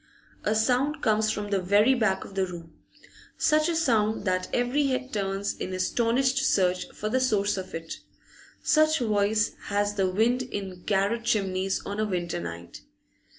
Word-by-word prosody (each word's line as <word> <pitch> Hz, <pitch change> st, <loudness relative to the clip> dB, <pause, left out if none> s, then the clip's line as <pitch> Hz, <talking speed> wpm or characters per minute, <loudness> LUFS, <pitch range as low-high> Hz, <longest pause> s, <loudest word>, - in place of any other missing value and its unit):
A 215 Hz, -, +1 dB
sound 255 Hz, +7 st, +1 dB
comes 215 Hz, -1 st, +2 dB
from 210 Hz, -1 st, -3 dB
the 195 Hz, -2 st, +1 dB
very 205 Hz, +7 st, +4 dB
back 220 Hz, -6 st, 0 dB
of -, -, -12 dB
the 190 Hz, -1 st, 0 dB
room, 170 Hz, -2 st, -10 dB, 0.6 s
such 310 Hz, +1 st, +3 dB
a 335 Hz, -, 0 dB
sound 225 Hz, -9 st, +1 dB
that 185 Hz, -1 st, 0 dB
every 255 Hz, +4 st, +1 dB
head 260 Hz, 0 st, -2 dB
turns 195 Hz, -1 st, -2 dB
in 185 Hz, -, -5 dB
astonished 245 Hz, +7 st, +1 dB
search 185 Hz, -8 st, +1 dB
for 215 Hz, -, -5 dB
the 255 Hz, +5 st, +1 dB
source 210 Hz, -6 st, +1 dB
of 190 Hz, -2 st, -6 dB
it. 165 Hz, 0 st, -6 dB, 0.6 s
Such 310 Hz, 0 st, +4 dB
voice 215 Hz, -3 st, +1 dB
has 205 Hz, 0 st, 0 dB
the 195 Hz, -2 st, +1 dB
wind 230 Hz, +6 st, +2 dB
in 195 Hz, -7 st, -6 dB
garret 205 Hz, +4 st, 0 dB
chimneys 195 Hz, -3 st, 0 dB
on 205 Hz, +1 st, -4 dB
a 215 Hz, -, +1 dB
winter 175 Hz, -4 st, -2 dB
night. 85 Hz, 0 st, -8 dB
210 Hz, 165 wpm, -26 LUFS, 190-245 Hz, 0.6 s, very